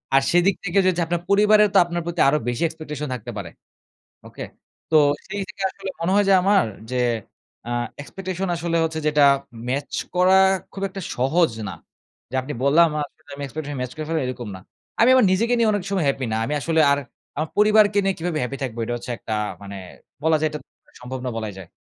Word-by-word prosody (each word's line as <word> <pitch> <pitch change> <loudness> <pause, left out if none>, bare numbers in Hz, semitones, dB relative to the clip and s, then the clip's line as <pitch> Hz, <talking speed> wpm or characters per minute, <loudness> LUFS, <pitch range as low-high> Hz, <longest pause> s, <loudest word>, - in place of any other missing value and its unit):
আর 135 - +6
সেদিক 175 +3 +4
থেকে 180 +1 -1
যে - - +4
হচ্ছে 175 -1 0
আপনার 170 0 -1
পরিবারেও 210 +1 +5
তো - - +5
আপনার 175 0 -3
প্রতি 170 0 -4
আরো 150 +2 +4
বেশি 120 +5 -1
expectation 150 -2 -6
থাকতে 125 -4 -6
পারে, - - -5 0.8
ওকে? - - -9 0.5
তো 160 - +4 0.3
সেই 200 +1 -4
থেকে 210 -4 -8
আসলে 195 0 -7
মনে 170 +3 0
হয় 205 0 +4
যে - - +6
আমার 195 +1 +4 0.3
যে 130 - -2 0.7
আ - - -4 0.3
expectation 190 +4 -5
আসলে 170 0 -1
হচ্ছে 160 0 -2
যেটা 150 -1 +3 0.5
ম্যাচ 140 +2 -2 0.2
করা 185 +1 +5 0.4
খুব 195 - -7
একটা 195 +1 -7 0.2
সহজ 155 +6 +2 0.2
না। - - -5 0.6
যে - - -10
আপনি 140 +3 -6
বললাম 160 +5 +5
আর - - 0
আসলে - - -23
আমি 145 - -7
expectation 145 +1 -6
ম্যাচ 125 -1 -4
করে 155 - -4
ফেললাম 160 -3 0
এরকম 125 -3 -5
না। - - -11 0.4
আমি 235 - +6
আমার 255 -5 +5
নিজেকে 230 +6 +1
নিয়ে 230 -2 +3
অনেক 205 -2 -1
সময় 190 -5 0
হ্যাপি 135 -2 -1
না। - - 0
আমি 145 - -2
আসলে 160 +2 +2
আর 140 - +1 0.4
আমার 155 +2 -2
পরিবারকে 210 -1 +5
নিয়ে 195 0 +1
কিভাবে 165 -1 -2
হ্যাপি 130 +2 -3
থাকবো? 120 -3 -4
এটা 120 +1 -3
হচ্ছে 120 - -8
একটা 110 - -4 0.3
মানে 100 0 -8 0.5
বলা 160 0 +4
যায় 155 - +2
এটা 150 - -5 0.4
সম্ভব 130 +1 -6
না - - -1
বলাই 110 -2 -4
যায়। 95 -3 -10
165 Hz, 210 wpm, -22 LUFS, 135-195 Hz, 0.8 s, আর